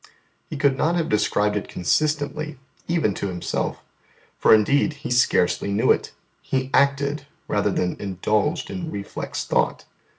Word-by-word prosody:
He 155 - -5
could 140 -1 +2
not 165 +3 +2
have 165 -2 0
described 105 0 +1
it 105 - -3
consistently 155 - -1 0.3
even 165 - +1
to 100 - -3
Himself, 90 -2 -3 0.6
for - - +4
indeed 140 +8 +4
He 150 -2 -7
scarcely 120 -5 +2
knew 100 - +3
it: - - 0 0.3
He 130 0 -2
acted 140 +1 +2 0.2
rather - - +1
than 90 -1 -1
indulged 105 - -1
in 175 -4 -4
reflex 100 -8 -5
thought. - - 0
140 Hz, 140 wpm, -23 LUFS, 105-155 Hz, 0.6 s, for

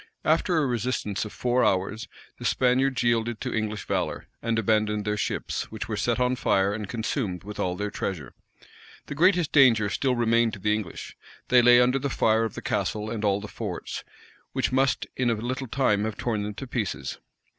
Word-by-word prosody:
After 165 +2 +2
a 155 - +3
resistance 120 -4 -1
of 105 - -7
four 125 0 +1
hours, 100 +4 0 0.3
the - - -7
Spaniards 130 +1 +2
yielded 115 -1 +1
to - - -3
English 110 -2 -2
valor, - - -2 0.2
and 115 0 0
abandoned 105 -1 +1
their 105 0 0
ships, 105 - -3
which 110 0 -6
were 110 - -2
set 120 +3 0
on 125 0 +2
fire, 100 -4 +2
and 105 -2 -5
consumed 110 - -2
with 105 +1 -8
all 90 -1 0
their 105 +2 -3
treasure. 80 -9 -4 0.7
The - - -6
greatest 175 +1 +3
danger 115 -8 +5
still 130 -2 +1
remained 115 -1 +2
to 105 - -7
the 105 +2 +1
English. 105 -6 -5 0.3
They 125 -1 +6
lay 120 0 +7
under 125 +2 +3
the 140 +1 -2
fire 115 -2 +2
of 110 - -5
the - - -7
castle 105 0 -2
and 110 -2 -4
all 100 -1 +2
the 105 - -7
forts, - - -5 0.5
which - - 0
must 135 +1 +2
in 125 -1 +1
a 115 - +2
little 125 +4 -4
time 110 -5 +1
have 110 -2 -4
torn 110 -4 -1
them 105 0 -4
in 135 - -6
pieces. 115 -6 -3
115 Hz, 200 wpm, -26 LUFS, 105-125 Hz, 0.7 s, lay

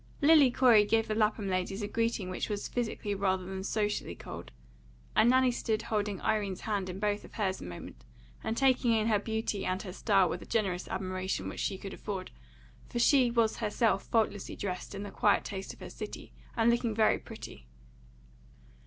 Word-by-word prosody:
Lily 295 -2 +7
Corey 240 -4 +6
gave 225 +2 +2
the 215 - -1
Lapham 215 -1 +1
ladies 190 +2 -1
a - - -1
greeting 225 -4 -1
which 185 - -3
was 205 -1 -2
physically 220 -3 -2
rather 190 -2 0
than 190 0 -5
socially 210 +1 -1
cold, - - -9 0.6
and 235 - +6
Nanny 255 0 +5
stood 220 -2 -1
holding 205 -3 -1
Irene's 205 -4 0
hand 200 -4 -2
in 180 - -5
both 205 0 0
of - - -14
hers 195 -3 -1
a - - -7
moment, 90 -1 -9 0.4
and 225 - -2
taking 255 -3 +3
in 220 -1 +2
her 210 -2 +3
beauty 220 -2 -2
and 185 0 -1
her 185 -3 -7
style 195 -2 +3
with - - -4
a - - -11
generous 190 -5 0
admiration 185 0 -3
which - - -7
she 190 - -1
could 195 0 -7
afford, 195 -3 -5 0.6
for - - -4
she 250 +1 +5
was 230 -2 +2
herself 210 -2 +1
faultlessly 220 -3 0
dressed 185 0 -4
in 200 - -5
the 205 - -7
quiet 205 +1 +3
taste 195 -1 -5
of - - -15
her - - -7
city, - - -8 0.2
and 230 +1 +5
looking 235 -2 0
very 220 -1 +3
pretty. - - -10
210 Hz, 190 wpm, -31 LUFS, 195-225 Hz, 0.6 s, Lily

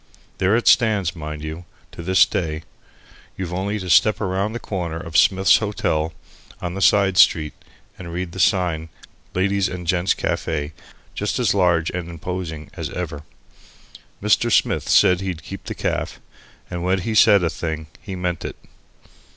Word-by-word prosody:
There 95 +3 +3
it 120 - 0
stands, 105 -7 +3
mind 75 -1 -6
you, 80 +3 -6 0.3
to - - -9
this 95 +1 +5
day. 80 -3 -3 0.7
You've 90 -2 -4
only 100 +4 -2
to 95 -3 -6
step 105 +6 +5
round 100 +2 -1
the - - -3
corner 90 -7 -4
of 85 -1 -8
Smith's 95 +3 +5
Hotel 80 -7 -1 0.5
on 90 0 -4
the 95 - -5
side 95 +1 +4
street 75 -3 +4 0.5
and 85 -2 -7
read 90 0 -4
the 95 - -8
sign: 85 -4 +1 0.5
LADIES' 100 +1 +1
AND 90 -1 -6
GENT'S 90 +2 +1
CAFE, 75 -2 -2 0.4
just 105 - -2
as 120 -5 +2
large 90 -4 +2
and 90 -2 -4
as - - -8
imposing 85 -3 -6
as - - -5
ever. 80 -5 -5 1.0
Mr. 105 +3 +3
Smith - - +2
said 90 -1 +5
that - - -6
he'd 90 -5 -4
keep - - -9
the - - -5
caff, - - -3 0.5
and 90 -1 -5
when 95 +1 +1
he 110 +5 -2
saida 100 -4 +6
thing 80 -1 -4 0.2
he 95 - -6
meant 90 -2 -3
it! - - -5
90 Hz, 165 wpm, -21 LUFS, 80-95 Hz, 1.0 s, saida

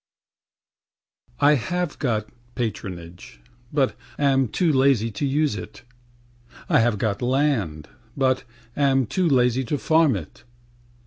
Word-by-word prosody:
811_] - - +4
I - - +6
have 165 +5 -2
got 110 -5 -1 0.3
patronage, 90 - -6 0.3
but 140 -3 +1 0.2
am 135 -2 +2
too 165 - +1
lazy 130 -4 +3
to 140 +7 -2
use 145 +1 +1
it; 120 - -9 0.8
I 150 -5 +4
have 115 -2 +2
got 100 -1 -1
land, 120 - 0 0.3
but 130 -2 +1 0.3
am 135 -2 +2
too 175 - 0
lazy 125 -1 +2
to 145 +5 -1
farm 160 -4 +3
it. 80 -6 -8
130 Hz, 125 wpm, -23 LUFS, 110-145 Hz, 0.8 s, I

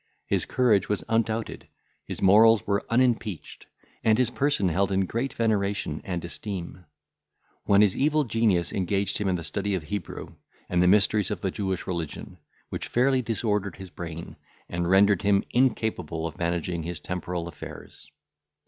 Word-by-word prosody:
His - - -1
courage 110 -7 +2
was 105 -2 -1
undoubted, 115 0 -1 0.4
his - - -5
morals 110 +3 +6
were 100 -1 0
unimpeached, 115 - 0 0.4
and 110 -1 +4
his 125 -1 +2
person 140 -9 +1
held 95 +4 +1
in 95 0 +2
great 120 +8 -2
veneration 100 -8 -1
and 90 -3 -4
esteem; 90 -1 -6 0.8
when 100 0 +5
his 105 -3 +4
evil 150 +2 +2
genius 110 -7 +1
engaged 100 +1 0
him 105 - -1
in 95 - +1
the 85 - -4
study 100 +3 -1
of 90 - -3
Hebrew, 90 +2 -6 0.4
and 90 0 +2
the 90 - +4
mysteries 105 +1 +4
of 105 -5 -4
the 95 - -1
Jewish 95 -2 -3
religion, 85 0 -5 0.3
which - - -4
fairly 130 +1 +2
disordered 105 -3 -1
his 95 -2 -10
brain, 85 -2 -7 0.3
and 85 0 -2
rendered 100 0 +5
him 100 -1 +3
incapable 110 - 0
of 80 - -6
managing 85 0 -1
his 85 +1 -4
temporal 90 -1 -4
affairs. 85 - -11
100 Hz, 155 wpm, -26 LUFS, 90-110 Hz, 0.8 s, morals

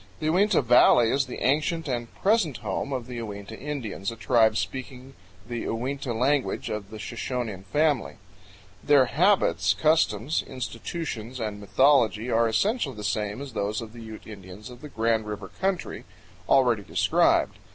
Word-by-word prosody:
The 155 0 0
Uinta 195 -2 +3
Valley 120 -1 +5
is 135 -1 +1
the 125 - -6
ancient 155 +5 +1
and 120 -3 -3
present 190 - +2
home 100 +7 -2
of 130 -3 -3
the 125 -1 -7
Uinta 105 -1 -7
Indians, 120 -9 -4
a 115 - -6
tribe 115 -1 +3
speaking 130 +6 -5 0.3
the 120 -1 -4
Uinta 130 +3 -3
language 130 +4 0
of 105 -2 -5
the 110 - -8
Shoshonean 115 -3 -4
family. 150 0 +1 0.7
Their 145 -3 +5
habits, 140 - +2
customs, 150 -2 +2
institutions, 125 -1 -5
and 105 -2 -4
mythology 120 0 +3
are 115 +1 +3
essentially 160 - 0
the 105 - -8
same 105 +3 -2
as 135 -4 -9
those 105 0 -2
of 115 -1 -8
the 120 - -10
Ute 110 -1 -10
Indians 100 +2 -10
of 125 +1 -13
the 150 - -9
Grand 115 -3 0
River 105 -1 -6
country, 190 -2 -2 0.4
already 125 -5 +4
described. - - +2
120 Hz, 155 wpm, -26 LUFS, 110-140 Hz, 0.7 s, Valley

